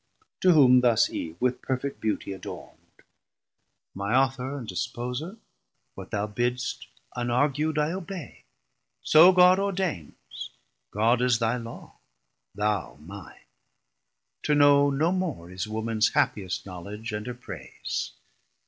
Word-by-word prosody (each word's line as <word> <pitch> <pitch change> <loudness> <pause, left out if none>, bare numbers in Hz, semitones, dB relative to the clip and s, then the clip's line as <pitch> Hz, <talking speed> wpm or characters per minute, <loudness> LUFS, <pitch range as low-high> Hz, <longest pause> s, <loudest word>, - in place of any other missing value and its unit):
To 185 -1 +5
whom 125 -5 +6
thus 120 -3 +3
Eve 80 0 -5
with 125 0 0
perfet 135 +1 -3
beauty 110 -2 -2
adornd. 95 - -10 0.9
My 100 +5 -1
Author 135 +1 +1
and 120 -5 -7
Disposer, 125 - -4 0.6
what - - -10
thou 105 0 -1
bidst 120 +3 -2 0.3
Unargu'd 140 +6 0
I 150 +1 +1
obey; 185 -5 -7 0.6
so 165 +4 +8
God 180 0 +6
ordains, 190 - -4 0.4
God 115 +4 +2
is 125 -2 +3
thy 115 +1 0
Law, 115 -1 -10 0.6
thou 105 -3 -1
mine: 95 +6 -12 1.0
to 150 - +1
know 145 0 +5
no 150 +5 +1
more 160 - -3
Is 90 +3 -4
womans 110 0 0
happiest 95 -4 0
knowledge 100 +5 -7
and 105 +2 -5
her 125 - -4
praise. 90 - -6
125 Hz, 120 wpm, -26 LUFS, 105-145 Hz, 1.0 s, so